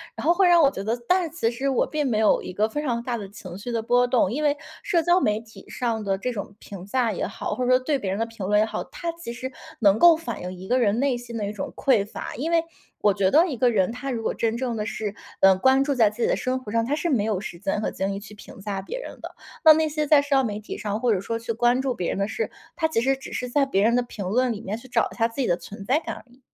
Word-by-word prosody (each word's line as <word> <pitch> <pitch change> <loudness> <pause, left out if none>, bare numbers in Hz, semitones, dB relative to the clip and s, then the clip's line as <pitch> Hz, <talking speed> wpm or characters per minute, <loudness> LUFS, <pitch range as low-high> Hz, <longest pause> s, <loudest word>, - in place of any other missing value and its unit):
然 - - -6
后 335 - +5
会 380 -1 +4
让 345 -1 +6
我 280 - +6
觉 195 - -6
得 225 +3 0
但 365 0 +3
是 325 - -4
其 230 -8 +1
实 260 +4 -3
我 265 - +2
并 300 -3 -1
没 220 -3 +1
有 215 - +3
一 - - -7
个 215 +3 +1
非 295 +5 -3
常 235 -4 -1
大 240 -1 -3
的 200 -2 -6
情 190 -3 -10
绪 240 +4 -6
的 230 -1 -1
波 245 +2 +3
动。 245 -5 +2
因 300 +5 -2
为 290 -1 +3 0.3
社 340 -2 +2
交 350 +3 +4
媒 210 -8 +1
体 225 -1 -15
上 230 -3 -2
的 195 -1 0
这 250 +5 -2
种 200 -2 -6
评 190 -2 -9
价 235 +1 +1
也 - - -2
好， - - -4
或 255 - -2
者 255 - +2
说 255 - +6
对 280 +2 0
别 195 -6 -3
人 200 - -2
的 225 - +1
评 225 -4 -7
论 210 +1 +3
也 - - +5
好， - - -4
它 340 -1 -5
其 335 -9 -7
实 260 +2 -6 0.3
能 205 -2 +5
够 340 +2 +8
反 240 - -6
映 180 +1 -5
一 185 +1 -10
个 250 - +2
人 225 -1 +2
内 270 -3 +1
心 240 -1 -9
的 205 -2 -2
一 - - -3
种 210 - -6
匮 230 -7 +2
乏。 210 - -7
因 315 +7 -2
为 335 -1 +3 0.4
我 205 -2 +4
觉 190 -1 +2
得 320 - +5
一 280 -9 -4
个 245 +1 +4
人， 200 -2 +2
他 250 +3 -5
如 230 -2 -3
果 - - 0
真 230 0 -1
正 245 -1 -2
的 210 - -2
是， 215 -2 -4 0.3
嗯， 190 -1 +6
关 265 +3 +4
注 285 0 0
在 225 -5 +4
自 225 +3 -9
己 - - +3
的 - - +2
生 255 0 -1
活 210 -5 -9
上， 230 0 +1
他 285 - 0
是 320 +3 -2
没 225 -8 +2
有 210 -4 0
时 170 -5 -7
间 205 +1 -1
和 - - -1
精 195 +1 -2
力 195 - -4
去 205 +1 -12
评 205 - -13
价 195 -1 -3
别 350 - -6
人 - - -9
的。 - - -8 0.3
那 315 - +11
那 315 0 +1
些 300 0 -1
在 290 -1 +6
社 285 - -9
交 270 - +4
媒 210 -2 -3
体 215 - -7
上 210 0 -3
或 245 -2 +2
者 195 - 0
说 230 +4 -3
去 230 0 -4
关 240 +3 +2
注 265 -2 -1
别 180 -6 -3
人 - - -2
的 200 +1 0
事， 460 - -2 0.3
他 320 -2 +2
其 270 -8 0
实 270 +2 +2
只 270 - -9
是 250 -1 -3
在 280 +2 +2
别 200 -7 +1
人 235 +2 +4
的 245 - +3
评 210 -5 -7
论 245 +5 +1
里 210 - -7
面 210 +1 -4
去 260 - -13
找 - - +1
一 - - -11
下 230 -1 +2
自 235 +4 -4
己 - - 0
的 175 - +2
存 195 +3 -10
在 275 +7 +3
感 330 - -6
而 - - -12
已。 250 - -22
235 Hz, 345 characters per minute, -24 LUFS, 210-270 Hz, 0.4 s, 那